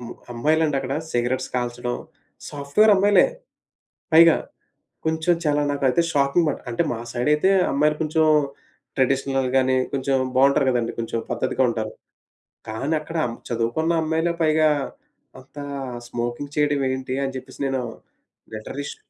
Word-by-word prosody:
హ్మ్. 120 -1 -8 0.2
అమ్మాయిలండక్కడ 140 0 +1 0.2
సిగరెట్స్ 125 +1 -1
కాల్చడం 120 0 -2 0.5
సాఫ్ట్‌వేర్ 145 +10 +3
అమ్మాయిలే. 205 +2 +5 0.9
పైగా. 165 0 +8 0.7
కొంచెం 160 +2 +2
చాలా 150 -1 +2
నాకైతే 140 +1 +2
షాకింగ్ 140 +3 +2
బట్ - - -3
అంటే 115 - -1
మా - - -4
సైడ్ 120 +3 -1
అయితే 150 +6 +2 0.2
అమ్మాయిలు 150 +2 +2
కొంచెం 160 0 +2 0.7
ట్రెడిషనల్ 135 0 +1
గాని 130 0 +3 0.2
కొంచెం 135 0 +1 0.2
బావుంటారు 135 +1 +4
గదండీ. 120 -2 0
కొంచెం 115 0 -2
పద్ధతిగా 130 - 0
ఉంటారు. 110 -2 -3 0.8
కానీ 135 +8 -2
అక్కడ 165 +2 -7
అం 115 - -4 0.2
చదువుకున్న 120 +9 0
అమ్మాయిలే 160 +2 0
పైగా 155 0 +4 0.7
అంతా 145 +2 -10 0.4
స్మోకింగ్ 120 +4 -4
చేయడం 145 -1 +2
ఏంటి? 130 0 -3
అని 135 -1 -3
చెప్పేసి 130 0 -10
నేను 135 -1 -1 0.7
లటరల్లీ 130 +6 -6
ష్ - - -13
140 Hz, 130 wpm, -23 LUFS, 125-155 Hz, 0.9 s, పైగా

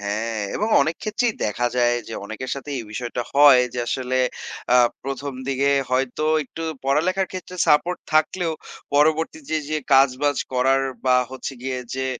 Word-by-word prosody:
হ্যাঁ 110 +2 -2 0.2
এবং 215 - -1
অনেক 160 +3 -2
ক্ষেত্রেই 225 +1 0
দেখা 115 +3 0
যায় 120 -1 +3
যে 115 - -6
অনেকের 110 +5 -6
সাথেই 140 +1 -5
এই 115 - -8
বিষয়টা 120 +2 -3
হয় 140 -3 +7
যে - - -3
আসলে 130 0 -1 0.6
আ - - +8 0.3
১ম 135 +1 -4 0.2
দিকে 135 +1 +1 0.2
হয়তো 130 +3 0 0.2
একটু 165 +4 -8 0.2
পড়ালেখার 180 +7 +1
ক্ষেত্রে 185 0 -7
সাপোর্ট 170 +4 +3 0.2
থাকলেও 165 +2 +2 0.4
পরবর্তীতে, 160 - +1
যে 155 0 0
কাজবাজ 135 +1 +4 0.2
করার 135 +1 +2 0.2
বা 125 - +5
হচ্ছে 130 +1 -6
গিয়ে 130 -1 -3 0.2
যে 130 0 -2
135 Hz, 150 wpm, -22 LUFS, 125-155 Hz, 0.6 s, আ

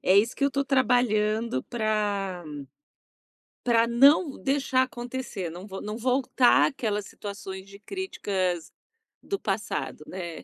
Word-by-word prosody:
é 190 +2 +4
isso 225 +5 +3
que 280 - +1
eu 280 - +3
tô 275 0 0
trabalhando 235 - +2
pra 205 -5 -1 1.2
pra 230 -1 +4
não 275 +5 +4
deixar 270 -2 +2
acontecer, 245 -7 -5
não 180 +4 -9
vo 195 -1 -7
não 210 +2 -5
voltar 255 0 +4
àquelas 210 -7 -2
situações 195 -2 -7
de 200 0 -12
críticas 195 - -3 0.5
do 395 - -3
passado, - - -3
né. 175 -3 -6
220 Hz, 125 wpm, -27 LUFS, 195-260 Hz, 1.2 s, é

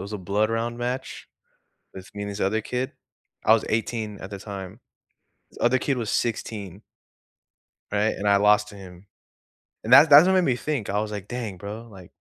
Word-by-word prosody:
was 100 +2 -6
a - - -4
blood 100 +4 0
round 115 +1 -2
match 125 +2 -5 0.6
with 95 0 -11
me 105 - -5
and 100 - -4
this 100 +1 -7
other 110 +3 0
kid. 130 +4 -3 0.5
I - - +6
was 110 - +3
18 110 -1 -2
at - - -8
the 100 - -6
time. 100 +1 -8 0.7
This - - -18
other 130 +2 +3
kid 135 0 -1
was 115 -3 -3
16. 105 -4 -3 1.1
Right? 105 +1 +1
And 105 - -3
I 100 0 +5
lost 105 +1 +3
to 105 - -12
him. 95 -1 -13 0.8
And - - -2
that 160 - +9
that's 145 +4 +9
what 190 - +3
made 185 - +4
me 130 -8 +1
think, 135 -4 -3
I 105 +1 0
was 110 0 -4
like, 100 -2 -6
"Dang, 120 -6 -5
bro," 105 +5 -8
like 95 -4 -14
105 Hz, 200 wpm, -24 LUFS, 100-120 Hz, 1.1 s, that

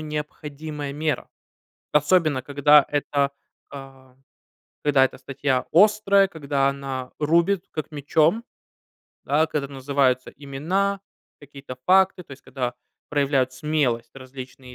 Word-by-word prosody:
необходимая 150 -1 -6
мера. 155 +1 -2 0.6
Особенно, 150 -2 +3
когда 145 +1 +5
эта, 140 -1 0 0.4
а, 135 -2 -12 0.7
когда 140 -2 +4
эта 130 - -3
статья 135 -1 -2
острая, 200 +1 +5
когда 140 -4 0
она 135 -2 -4
рубит, 170 +5 +2
как 155 - -5
мечом. 155 +8 +1 0.8
Да, 150 +3 +2
когда 150 -3 -3
называются 135 -2 0
имена, 170 +9 -2 0.4
какие-то 140 -2 -10
факты, 190 0 +4
то 145 - -26
есть 135 - -13
когда 125 -2 -4 0.3
проявляют 140 -3 +1
смелость 130 -4 -1
различные 130 -1 -11
145 Hz, 110 wpm, -23 LUFS, 135-155 Hz, 0.8 s, когда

